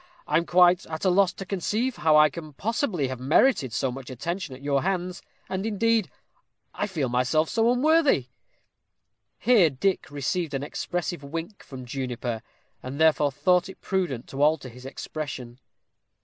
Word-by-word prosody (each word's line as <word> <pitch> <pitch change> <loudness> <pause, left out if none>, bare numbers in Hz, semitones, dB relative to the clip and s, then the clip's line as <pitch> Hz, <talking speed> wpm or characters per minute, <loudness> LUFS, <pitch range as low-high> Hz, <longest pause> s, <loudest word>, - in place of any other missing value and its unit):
I 150 - +2
am 170 - 0
quite 180 0 +5
at 160 +3 -5
a 185 - +4
loss 190 0 +4
to 195 - -8
conceive 215 +6 -1
how 155 -1 +4
I 150 0 +7
can 155 -2 -9
possibly 205 - -1
have 130 -1 -5
merited 140 - +3
so 130 +3 -1
much 135 +1 -8
attention 155 +3 -4
at 135 - -14
your 140 -1 +1
hands; 180 -1 -2 0.3
and, 190 0 -3
indeed, 225 0 +1 0.6
I 205 - -2
feel 160 -9 -2
myself 125 +6 +1
so 230 0 +2
unworthy 280 - +3 0.6
" - - -54 0.3
Here 215 -9 +5
Dick 180 +8 -1
received 145 +2 -2
an 135 - -2
expressive 175 +1 -4
wink 165 +8 -6
from 130 -2 -9
Juniper, 125 -3 -4 0.4
and 130 +3 -7
therefore 155 -2 +4
thought 180 +5 +2
it 190 - -11
prudent 175 -11 -2
to 135 - -5
alter 150 -3 +2
his 125 +2 -11
expression. 130 -4 -6
160 Hz, 165 wpm, -26 LUFS, 135-190 Hz, 0.6 s, I